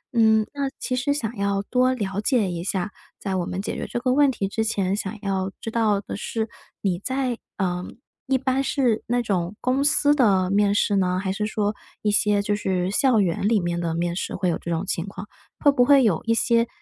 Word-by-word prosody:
嗯， 220 -1 +4
那 280 -1 -1
其 255 - -2
实 255 +3 0
想 230 -5 -3
要 200 0 0
多 255 +3 +2
了 200 -4 -3
解 215 -6 +1
一 170 0 -4
下 190 +1 -2 0.3
在 190 -2 -3
我 175 -2 -1
们 180 - -4
解 - - -4
决 - - -4
这 240 - -3
个 255 +1 0
问 285 0 +5
题 200 -5 -2
之 220 +3 -1
前， 200 -3 0
想 210 +1 -4
要 195 -1 -1
知 225 - -4
道 215 -3 +2
的 - - -6
是 220 +2 -3 0.3
你 180 -3 0
在 260 0 -2 0.2
呃， 180 -2 -1 0.4
一 265 0 +3
般 265 +1 0
是 255 -6 +1
那 245 0 +1
种 185 -2 -1
公 260 +2 +1
司 290 0 +4
的 195 -9 +3
面 205 0 +3
试 205 - +2
呢， 185 -1 +1
还 190 -1 -2
是 210 +2 -2
说 210 -1 -1 0.3
一 210 - +2
些 205 0 +2
就 205 0 0
是 190 -2 -1
校 255 -1 +3
园 190 +1 +1
里 220 -2 +3
面 175 -1 -2
的 165 -1 -2
面 170 0 -1
试 - - -3
会 185 -1 0
有 165 - -1
这 170 - -7
种 165 +3 -1
情 180 0 -2
况， 195 +1 -8 0.3
会 285 - +5
不 250 -3 +3
会 275 0 +6
有 190 -8 +2
一 230 0 +2
些， 230 0 +2
210 Hz, 245 characters per minute, -24 LUFS, 190-245 Hz, 0.4 s, 会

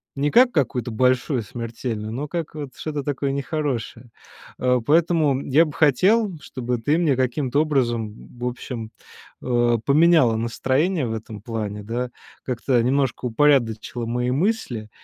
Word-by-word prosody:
Не 145 +2 0
как 245 +1 +6
какую-то 125 - -1
большую, 125 +2 +1
смертельную, 115 -1 -5
но 145 +4 -4
как 165 -1 -4
вот 140 -4 -7
что-то 150 -3 -4
такое 140 -1 -2
нехорошее, 140 -4 -3 0.5
а. 125 0 +2
Поэтому 155 -1 +2
я 155 +5 +5
бы 150 - -7
хотел, 185 - +3
чтобы 125 -1 -3
ты 145 +8 +1
мне 150 -6 +2
каким-то 130 +2 0
образом 120 -8 -1
в 125 - -4
общем, 120 -2 -5 0.5
э, 120 -1 +2
поменяла 150 -5 +5
настроение 130 +6 0
в 110 - -3
этом 110 -2 -7
плане, 105 -2 -4
да, 120 +3 -3 0.3
как-то 125 0 0
немножко 135 0 0
упорядочила 120 -3 +1
мои 125 +1 -1
мысли, 135 - -1
130 Hz, 140 wpm, -23 LUFS, 120-150 Hz, 0.5 s, как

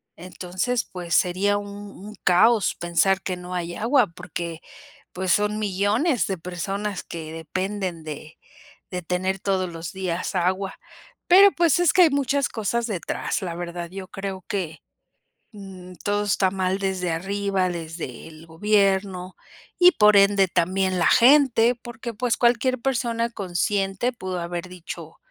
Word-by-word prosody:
entonces, 185 +7 -3
pues 175 -2 -6
sería 195 +3 +2
un 205 0 -6 0.2
un 210 +3 -11
caos 205 +4 +4
pensar 175 +3 +1
que 185 -2 -3
no 180 0 -8
hay 175 -1 -3
agua, 245 +4 +3
porque, 170 0 -7 0.5
pues, 185 0 -1
son 210 +1 +2
millones 210 - +1
de 190 -2 -2
personas 195 +3 -4
que 160 -2 -7
dependen 185 +2 -4
de 155 +1 -8 0.5
de 180 -1 -4
tener 185 +3 -2
todos 190 -1 -1
los 165 -1 -7
días 185 -1 -3
agua. 190 +2 -1 0.5
Pero, 395 +3 +8
pues, 340 -2 +2
es 350 -2 +4
que 365 - +7
hay 330 - +6
muchas 280 0 +1
cosas 230 +2 -2
detrás, 200 +1 -3
la 180 -3 -4
verdad, 175 0 -5
yo 190 0 -7
creo 195 -1 -6
que, 175 -6 -4 0.7
mm, 190 -3 -11
todo 205 0 +1
está 195 -2 +2
mal 190 0 -1
desde 190 -2 -2
arriba, 195 +2 -1
desde 165 -7 -6
el 160 0 -14
gobierno 190 0 +1 0.4
y 360 0 +8
por 210 - +5
ende, 200 -1 +5
también 185 +2 0
la - - +4
gente, 245 -2 +5
porque, 240 0 -8
pues, 240 +2 0
cualquier 245 +2 +2
persona 235 -2 0
consciente 195 +3 -1
pudo 185 -5 -5
haber 175 +1 -5
dicho: 180 -2 -9
190 Hz, 145 wpm, -24 LUFS, 180-215 Hz, 0.7 s, Pero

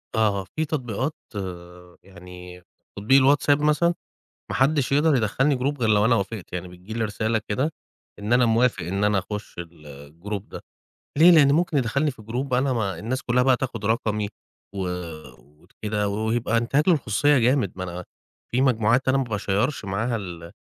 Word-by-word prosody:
آه، 110 -1 +3
آه، - - -8
في 155 - 0
تطبيقات 130 0 -3 0.9
يعني 90 -1 -12 0.4
تطبيق 130 +7 +4
الWhatsapp 145 +1 +3
مثلًا. 150 +3 +2 0.6
ما - - -2
حدش 135 0 +2
يقدر 145 +1 +4
يدخّلني 130 +5 +1
group 140 +2 -2
غير 115 - +1
لو 105 -1 +4
أنا 115 +2 +4
وافقت 100 -1 -4
يعني 90 0 -5
بتيجي 90 +4 -12
لي 115 -1 -1
رسالة 110 +1 -1
كده 135 +10 -1 0.5
إن 105 +2 -3
أنا 125 0 +5
موافق 115 +2 +2
إن 95 +3 -1
أنا 105 -1 +2
أخش 105 -1 -6
الgroup 85 +4 -8
ده. - - -10 0.6
ليه؟ 170 +4 +8
لأن 150 -5 +6
ممكن 160 0 +1
يدخلني 140 +4 +1
في 120 - -15
جروب 125 +5 -4
أنا 130 +1 +2
ما 100 -7 -2
الناس 130 +6 -3
كلها 125 +1 +2
بقى 130 -1 +4
تاخد 115 -5 -4
رقمي. 105 -2 0 0.5
و 95 -2 -2 0.8
وكده 105 -1 -3
و - - -3
وهيبقى 115 0 0
أانتهاك 135 +7 +1
للخصوصية 145 - +3
جامد 125 -4 +2
ما 90 - -5
أنا 90 0 -6 0.5
في 125 - +1
مجموعات 120 0 +2
أنا 130 +1 +3
ما 135 - +1
باشَيَّرش 105 +2 -1
معاها 110 +5 -1
ال 85 -5 -7
115 Hz, 170 wpm, -24 LUFS, 100-135 Hz, 0.9 s, ليه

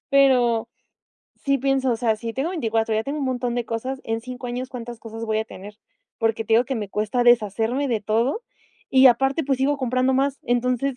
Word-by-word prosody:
pero 245 -5 +4 0.7
sí 275 0 0
pienso, 270 -1 +1
o - - -1
sea, 225 -2 +1
si 230 +1 -5
tengo 280 +6 -1
24 225 -9 0
ya 220 - +1
tengo 285 +2 -3
un - - -1
montón 245 -2 -1
de 240 -1 -1
cosas, 255 +4 -4
en 225 0 -2
5 250 +1 -7
años, 250 +2 -4
¿cuántas 240 -2 -7
cosas 225 0 -7
voy 220 -1 0
a 220 - -1
tener? 205 +3 -11 0.4
Porque 225 -1 0
te - - -2
digo 240 +2 +5
que 270 - -3
me 205 -3 -4
cuesta 215 +4 0
deshacerme 240 +4 +2
de 225 -3 0
todo 235 - 0 0.5
y, 265 0 +7
aparte, 270 +5 +3
pues 270 -1 +1
sigo 285 +2 +1
comprando 255 0 +1
más, 275 +1 +1
entonces 250 +2 0
245 Hz, 210 wpm, -23 LUFS, 225-265 Hz, 0.7 s, y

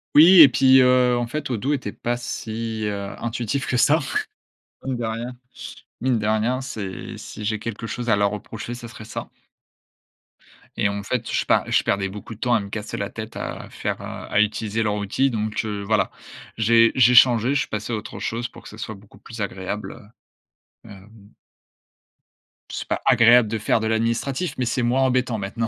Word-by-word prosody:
Oui 170 +3 +9
et 145 - +10
puis, 130 -1 +5
heu, 125 -1 +4
en 120 - 0
fait 150 +4 -4
Odoo 125 +4 -1
était 130 -8 -2
pas 120 0 -2
si, 115 -2 -4
heu, 100 -1 -4
intuitif 120 +3 -2
que 125 - -1
ça, 150 +6 +4 0.9
mine 130 -1 -2
de 120 - -4
rien. 115 +3 -4 0.7
Mine 125 -1 +2
de 105 - -3
rien, 110 +4 +1
c'est 105 -7 -6
si 105 - -8
j'ai 110 0 -1
quelque 115 0 -6
chose 120 +1 -4
à 105 - +5
leur 100 -1 +2
reprocher, 110 +3 -6
ça 120 -1 -8
serait 110 -2 -11
ça - - -7 1.5
et 100 - +2
en 100 0 -4
fait, 115 +3 -2
je - - 0
pars - - +2
je - - +3
perdais 100 -1 0
beaucoup 105 +3 -9
de - - -21
temps 125 +1 +1
à 115 - +4
me 100 -1 -7
casser 105 0 -5
la - - -3
tête, - - -8
à - - -6
faire, - - -4
heu, - - -7
à - - -3
utiliser 110 +1 -1
leur 105 -1 0
outil. 105 +7 0
Donc, 110 -2 -2
heu, 105 -2 -3
voilà. 110 +2 +1 0.5
J'ai 115 +1 +5
j'ai 125 -1 +5
changé. 125 0 +6
Je - - +3
suis - - -3
passé 110 +2 -4
à - - +1
autre 105 - -8
chose 120 +1 -3
pour - - -15
que - - -11
ce 105 - -12
soit 110 -1 -6
beaucoup 100 0 -18
plus 115 +1 -9
agréable, 100 +2 -5 0.7
heu, - - -13
hem 100 +1 -15 1.4
c'est - - -5
pas - - -2
agréable 120 -1 +6
de 110 - -2
faire 110 +1 +1
de 110 - -2
l'administratif, 115 +8 -1
mais 130 - 0
c'est 120 +1 -1
moins 125 +3 +2
embêtant 125 -3 +1
maintenant. 105 +4 -3
115 Hz, 200 wpm, -23 LUFS, 105-125 Hz, 1.5 s, et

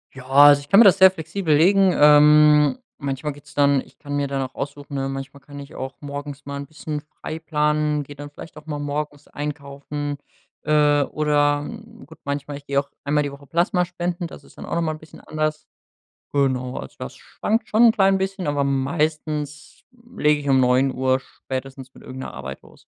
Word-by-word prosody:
Ja, 130 - -10
also 145 +1 +7
ich 140 - -15
kann 195 - +6
mir 230 - +10
das 190 -3 +6
sehr 190 0 +9
flexibel 160 -2 -1
legen. 190 +4 +5
Ähm, 150 -1 +6 0.2
manchmal 140 +1 -3
geht's 145 +1 -17
dann 140 -2 +3
ich - - -19
kann 145 -1 -6
mir 140 -1 0
dann 135 -1 -2
auch 130 - -7
aussuchen, 145 0 -7
ähm 135 0 -2
manchmal 135 +1 -7
kann 145 +1 -11
ich 140 - -11
auch 130 +1 -6
morgens 145 0 -7
mal 140 0 -6
'n 140 0 -7
bisschen 155 0 -6
frei 155 +1 -8
planen, 150 -1 0
geh 145 - -11
dann 145 0 -9
vielleicht 150 +3 -12
auch 150 0 -13
mal 150 -2 -3
morgens 145 0 -4
einkaufen 145 0 -5 0.5
äh, 150 -1 +3
oder 145 0 +1 0.4
gut 160 +2 -16
manchmal 140 0 -4
Ich 145 - -16
geh 140 0 -1
auch 140 0 0
einmal 150 +1 +1
die 145 - -4
Woche 140 0 -13
Plasmaspenden, 175 +1 -1
das - - -13
ist - - -20
dann - - -8
auch - - -3
noch 170 - +1
mal 155 - 0
'n 155 - -7
bisschen 155 - -15
anders. 155 0 -3 0.7
Genau, 130 -3 0
also 65 - -8
das 65 - -7
schwankt 225 +3 -2
schon 225 +3 +4
'n 230 - +7
klein 195 -2 +3
bisschen, 190 0 -3
aber 145 -1 0
meistens 150 +2 -2 0.3
lege 150 -4 +2
ich 145 -1 -4
um 130 -1 +4
9:00 130 +1 +2
spätestens 130 0 -8
mit - - -15
irgend 130 - -9
'ner - - -8
Arbeit 70 0 -7
los. - - -20
145 Hz, 200 wpm, -22 LUFS, 140-155 Hz, 0.7 s, mir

